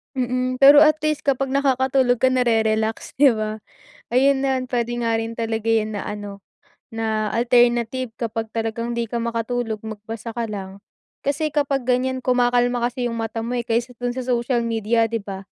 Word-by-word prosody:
Mm, 255 +1 -1
pero 280 +2 +9
at 305 +1 +6
least 305 -1 -1
kapag 275 -1 +1
nakakatulog 265 -2 +2
ka 260 - +5
na-re-relax, 225 -3 0
'di 275 -2 +6
ba? 215 0 -3 0.5
Ayun 265 +2 +3
na 270 -1 +1
puwede 240 -1 -2
nga 230 -1 0
rin 225 0 -6
talaga 225 -1 -2
yun 220 -1 +1
na 205 - -3
ano 205 -1 -7 0.5
na 220 -1 -1
alternative 240 0 +2
kapag 225 -1 -3
talagang 230 +1 -2
'di 235 -2 -3
ka 235 - -2
makatulog, 230 -1 -2
magbasa 220 +1 -7
ka 230 0 -3
lang. 195 -2 -7 0.5
Kasi 300 +2 0
kapag 280 -2 0
ganyan, 255 +1 0
kumakalma 245 -1 +2
kasi 245 0 -2
yung 230 - -4
mata 225 0 -3
mo, 245 +2 -2
eh, 235 - -4
kaysa 235 +1 -2
dun 245 0 -2
sa 260 - -3
social 240 -1 0
media, 225 0 0
'di 230 - -1
ba? 195 -1 -6
240 Hz, 175 wpm, -22 LUFS, 225-255 Hz, 0.5 s, pero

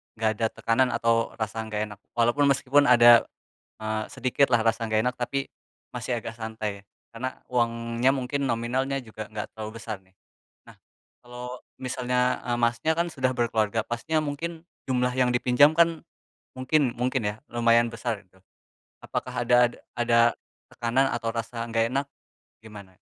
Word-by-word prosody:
enggak 110 0 +1
ada 115 - +1
tekanan 125 +3 +2
atau 115 0 +1
rasa 110 0 -3
enggak 105 -1 -3
enak. 105 - -10 0.2
Walaupun 120 +5 +2
meskipun 140 +1 +3
ada 120 -2 +7 0.5
eee, 110 0 -2
sedikit 130 +1 +1
lah 120 -2 +4
rasa 115 0 +1
enggak 110 +2 +1
enak, 125 - 0
tapi 135 +3 -2 0.5
masih 120 0 -2
agak 115 0 -7
santai, 110 -3 -5 0.3
karena 130 +3 -5
uangnya 115 0 +1
mungkin 140 +1 -2
nominalnya 130 +4 -1
juga 110 -3 -9
enggak 105 -1 -4
terlalu 110 -1 -6
besar 110 -2 -5
nih. 95 0 -30 0.5
Nah, - - -15 0.5
kalau 125 +1 -8 0.2
misalnya 125 0 0
eee, 120 -1 0
Masnya, 120 +6 +1
kan 170 - +2
sudah 130 -3 0
berkeluarga, 110 -2 0
pastinya 135 +7 -1
mungkin 165 +3 -5 0.2
jumlah 125 0 +1
yang 125 -1 +2
dipinjam 125 +4 +5
kan, 165 -2 +3 0.5
mungkin 130 0 +1
mungkin 125 +1 -1
ya, 105 0 -1
lumayan 115 0 +3
besar 115 -2 -4
gitu. 95 -1 -28 0.7
Apakah - - -3
ada 125 - +4
ad - - -14 0.2
ada 120 -1 +2 0.5
tekanan 120 +3 +1
atau 115 - -2
rasa 115 0 -4
enggak 115 0 0
enak, 140 +1 0 0.6
gimana? 100 -4 -12
120 Hz, 155 wpm, -26 LUFS, 115-130 Hz, 0.7 s, ada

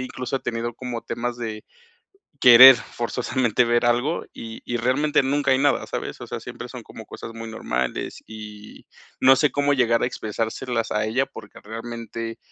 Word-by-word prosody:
incluso 130 +1 -4
he - - -5
tenido 120 0 -4
como 125 -2 -5
temas 120 0 -4
de 110 -2 -6 0.8
querer 125 +1 +10
forzosamente 120 +1 -1
ver 120 0 +1
algo 120 +7 0
y 115 0 -9
y 120 - -3
realmente 130 +5 +1
nunca 140 +1 +1
hay 130 - +4
nada, 145 +1 +1
¿sabes? - - -5
O - - -7
sea, - - -4
siempre - - -8
son - - -9
como - - -11
cosas - - -9
muy 115 0 -7
normales 65 - -3
y 105 -1 -11 0.3
no 130 +1 +7
sé 150 +2 +2
cómo 145 0 +1
llegar 120 -3 +2
a - - +1
expresárselas 115 +1 -3
a 105 0 0
ella, 125 +5 0
porque 110 -5 -12
realmente, 115 +1 -7
120 Hz, 175 wpm, -23 LUFS, 115-130 Hz, 0.8 s, querer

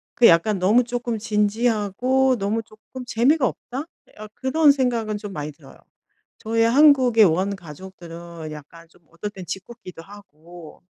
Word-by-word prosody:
그 240 - +6
약간 175 +5 +3
'너무 210 +7 +3
쪼끔 240 -1 -3
진지하고 225 +4 0
너무 215 +2 -2
쪼끔 220 +4 -12
재미가 255 +5 +2
없다?' 265 +4 -5 0.2
예 - - -25
아 215 - -8
그런 290 +3 +3
생각은 240 -6 -1
좀 205 -1 -8
많이 150 -1 -5
들어요. 145 - -18 0.6
저의 225 +1 0
한국의 255 -5 +5
원가족들은 170 -2 -5
약간 155 +3 -13
좀 175 - -26
어떨 170 +5 -6
땐 190 -3 -10
짓궂기도 185 -1 -9
하고 175 -4 -15
210 Hz, 300 characters per minute, -22 LUFS, 175-245 Hz, 0.6 s, 그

